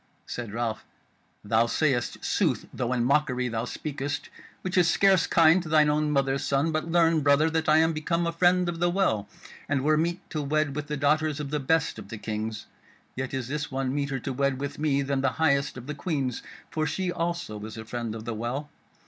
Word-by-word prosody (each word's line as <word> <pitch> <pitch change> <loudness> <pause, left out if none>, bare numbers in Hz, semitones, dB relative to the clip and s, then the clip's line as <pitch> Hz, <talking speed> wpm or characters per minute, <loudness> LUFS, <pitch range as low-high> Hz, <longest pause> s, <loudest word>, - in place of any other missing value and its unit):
Said 120 -4 -5
Ralph: 115 0 -2 0.6
"Thou 110 +3 +2
sayest 130 -2 0
sooth, - - +1
though 125 -1 -2
in 125 -2 +1
mockery 125 -2 +1
thou 115 0 -2
speakest, 145 +1 -4 0.3
which 185 - -3
is 175 -2 +5
scarce 190 -1 +4
kind 165 +2 +5
to 165 - -8
thine 150 -1 +5
own 150 0 +1
mother's 135 -1 +1
son: 140 +4 +1
but 155 +1 -2
learn, 165 -2 +4
brother, 145 +3 +4
that 160 -1 0
I 155 - +6
am 160 +1 +4
become 170 +2 -1
a 170 - 0
Friend 180 +1 +3
of 170 -1 -3
the 175 +1 +2
Well, 175 - +1 0.4
and 140 -2 +1
were 155 +1 +3
meet 170 +3 -1
to 155 - -2
wed 145 0 0
with 150 0 -4
the 150 - -3
daughters 150 +1 +1
of 145 -1 -5
the 150 - 0
best 145 -3 +1
of 100 -2 -10
the 115 - -6
Kings: 110 0 -4 0.5
yet 130 0 -3
is 130 -3 -3
this 145 +2 -3
one 135 -1 -1
meeter 140 -1 -1
to 130 +1 -4
wed 140 0 0
with 140 +1 -5
me 140 -2 +1
than 135 0 -1
the 135 -1 +1
highest 140 -4 +2
of 125 - -8
the 150 - -4
Queens; 140 -5 -2 0.3
for 155 -1 0
she 180 +4 -1
also 170 -12 -3
is 110 +1 -7
a 110 - -7
Friend 115 -1 -4
of 110 0 -8
the 120 - -3
Well. 125 +7 -4
145 Hz, 215 wpm, -27 LUFS, 125-160 Hz, 0.6 s, I